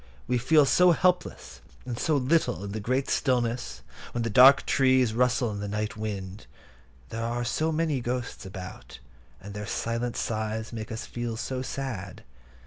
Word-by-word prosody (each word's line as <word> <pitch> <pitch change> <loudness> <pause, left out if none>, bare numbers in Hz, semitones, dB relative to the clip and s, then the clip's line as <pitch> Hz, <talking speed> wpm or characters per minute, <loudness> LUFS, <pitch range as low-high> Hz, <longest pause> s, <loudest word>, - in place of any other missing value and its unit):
We 125 -1 0
feel 145 +4 +5
so 180 +7 +5
helpless 180 +2 -1 0.2
and 120 -2 -5
so 155 -2 +2
little 130 - +1
in 100 - -5
the 110 - -4
great 130 +6 -1
stillness, 125 -2 -1 0.3
when 120 - -1
the 115 - -2
dark 130 +5 +7
trees 130 -4 +3
rustle 125 -1 +2
in 100 - -5
the 105 - -4
night 105 +1 -3
wind. 100 -2 -6 0.6
There 115 - -4
are 120 +1 -2
so 155 +6 0
many 155 -4 0
ghosts 125 +1 -4
about, 90 - -9 0.4
and 100 +1 -9
their 105 0 -6
silent 115 +1 -2
sighs 110 0 -3
make 110 -1 -6
us 110 - -5
feel 120 -1 -4
so 130 +2 -3
sad. 125 -8 -5
120 Hz, 165 wpm, -27 LUFS, 110-130 Hz, 0.6 s, dark